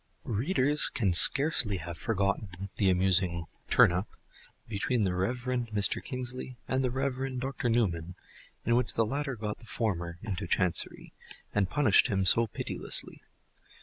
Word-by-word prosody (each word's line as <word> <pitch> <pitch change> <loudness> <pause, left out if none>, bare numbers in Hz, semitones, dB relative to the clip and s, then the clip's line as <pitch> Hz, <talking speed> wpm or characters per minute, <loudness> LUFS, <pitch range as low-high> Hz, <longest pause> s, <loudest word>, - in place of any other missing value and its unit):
Readers 140 - +2
can 100 -6 -1
scarcely 120 - +4
have 85 0 -7
forgotten 100 0 -3
the 100 - +2
amusing 90 -2 +2 0.2
"turn - - +5
up" 90 +4 -3 0.6
between 110 +2 -1
the 95 -2 0
Rev. 95 +7 -1 0.3
Mr. 105 -2 +3
Kingsley 125 -1 -6
and 130 0 -1
the 130 - 0
Rev. 130 0 -3
Dr. 130 -1 -3
Newman, 90 -7 -1 0.5
in 115 - +2
which 125 - +1
the 115 - +2
latter 135 +3 -3
got 105 -1 -5
the - - -16
former 85 -8 -3
"into 100 -3 -4
Chancery," 90 0 -1 0.4
and 100 -3 0
punished 140 -9 +3
him 95 -5 -1
so 115 +5 +5
pitilessly. - - 0
105 Hz, 145 wpm, -29 LUFS, 95-125 Hz, 0.6 s, turn